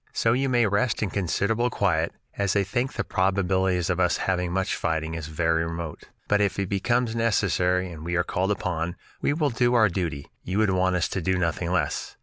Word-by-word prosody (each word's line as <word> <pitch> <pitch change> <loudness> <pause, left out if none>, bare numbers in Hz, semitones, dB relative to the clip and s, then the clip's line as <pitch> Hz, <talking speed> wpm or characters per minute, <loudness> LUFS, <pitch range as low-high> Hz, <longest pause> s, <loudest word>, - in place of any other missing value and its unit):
"So 115 - +2
you 135 +2 +1
may 120 -2 +3
rest 105 +3 +1
in 100 - -2
considerable 105 +5 0
quiet, 85 -7 +1 0.2
as 100 -1 0
I 100 - +3
think 120 +7 -2
the - - -2
probabilities 95 -1 +1
of 90 - -1
us 90 -1 +2
having 90 -2 -1
much 95 +1 0
fighting 80 0 -2
is 80 -2 -5
very 80 +1 +1
remote. 85 -1 -5 0.2
But 105 0 +3
if 100 -2 +1
it 100 -2 -2
becomes 120 +4 0
necessary 95 -5 +1
and 80 -2 -9
we 85 +1 -2
are 90 - +2
called 95 +1 -1
upon, 85 -4 -2 0.3
we - - +2
will 150 -2 +1
do 120 +1 +2
our 110 -3 +5
duty; 85 -6 -3 0.2
you 95 +2 -3
would 110 -2 +3
want 95 0 +2
us 85 - +1
to 95 - -2
do 95 +2 +1
nothing 85 -1 -1
less. 85 -6 -1
95 Hz, 210 wpm, -25 LUFS, 85-105 Hz, 0.3 s, our